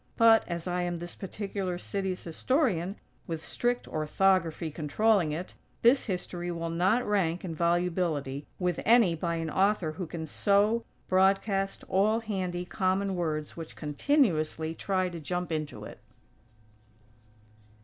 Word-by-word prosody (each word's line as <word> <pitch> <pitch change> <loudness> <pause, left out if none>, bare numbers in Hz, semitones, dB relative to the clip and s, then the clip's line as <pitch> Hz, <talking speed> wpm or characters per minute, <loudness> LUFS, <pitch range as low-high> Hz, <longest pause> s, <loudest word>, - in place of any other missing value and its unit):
But, 225 -1 +6
as 170 -2 -4
I 180 0 0
am 175 0 -1
this 175 +1 -6
particular 195 -2 -4
city's 190 0 -3
historian, 195 - 0 0.3
with 160 -1 -4
strict 245 0 -1
orthography 165 +1 +1
controlling 170 +4 +2
it, 170 +4 -5 0.3
this 245 +3 +5
history 180 -2 -3
will 165 -1 -3
not 190 +9 +2
rank, 185 -4 0
in 170 - -4
volubility, 170 -4 0
with 180 -2 -1
any 225 -6 +5
by 170 +1 -2
an 165 -1 -3
author 190 -3 +2
who 170 +2 -5
can 160 -1 -5
sow, 205 +7 +2 0.2
broadcast, 195 +1 +2
all 210 +4 +3
handy, 185 -5 -3
common 190 +1 0
words 155 -4 -2
which 165 -1 -8
continuously 160 - +1
try 185 +1 0
to 175 -2 -6
jump 175 +3 -3
into 155 -2 -4
it! - - -10
180 Hz, 135 wpm, -29 LUFS, 165-200 Hz, 0.3 s, But